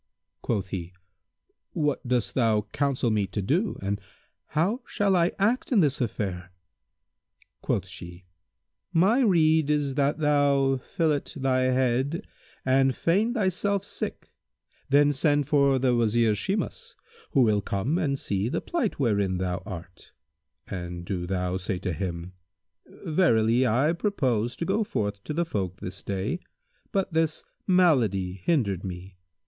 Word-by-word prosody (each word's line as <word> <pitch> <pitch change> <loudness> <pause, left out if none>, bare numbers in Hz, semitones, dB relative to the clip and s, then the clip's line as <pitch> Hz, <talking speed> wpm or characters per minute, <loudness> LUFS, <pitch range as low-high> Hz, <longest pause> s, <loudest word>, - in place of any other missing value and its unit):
Quoth 100 -5 -2
he, 90 -2 -5 0.8
"What 145 -4 -1
dost 125 -2 0
thou 115 -4 +2
counsel 135 -4 0
me 105 -2 +1
to 105 - -4
do 160 - 0
and 100 +1 -2 0.6
how 200 - +1
shall 200 -2 +1
I 170 0 +3
act 225 +8 +1
in 220 -6 +5
this 145 -3 +1
affair?" 95 -6 -3 1.1
Quoth 95 -1 -1
she, 90 0 -10 0.7
"My 195 +10 +4
rede 160 - +4
is 145 -2 +1
that 140 +1 +1
thou 140 -3 +3
fillet 155 0 -1
thy 130 -2 +1
head 130 +4 +1 0.4
and 135 0 +3
feign 210 +8 +1
thyself 200 -1 0
sick; - - -5 0.6
then 145 +1 +5
send 145 0 +1
for 140 -2 +4
the 130 -1 +2
Wazir 115 -1 +3
Shimas, 215 - -3 0.4
who 135 - +5
will 105 -4 +3
come 105 - -1
and 140 -6 0
see 100 -2 -1
the - - -1
plight 265 - -2
wherein 100 -7 +1
thou 90 0 -2
art; 90 -1 -9 0.5
and 90 -2 -6
do 90 -2 -3
thou 90 -1 -1
say 95 0 -3
to 90 -1 -3
him, 90 0 -4 0.7
'Verily 125 -8 +3
I 130 +8 +2
purposed 130 - 0
to 170 - -2
go 205 +4 +1
forth 105 - -3
to 150 - -3
the 170 +1 +1
folk 95 - -3
this 95 +1 -6
day; 100 - -2 0.5
but 195 -4 -1
this 160 -1 +1 0.2
malady 110 - +2
hindered 105 - +1
me. 90 0 -8
130 Hz, 140 wpm, -26 LUFS, 100-160 Hz, 1.1 s, in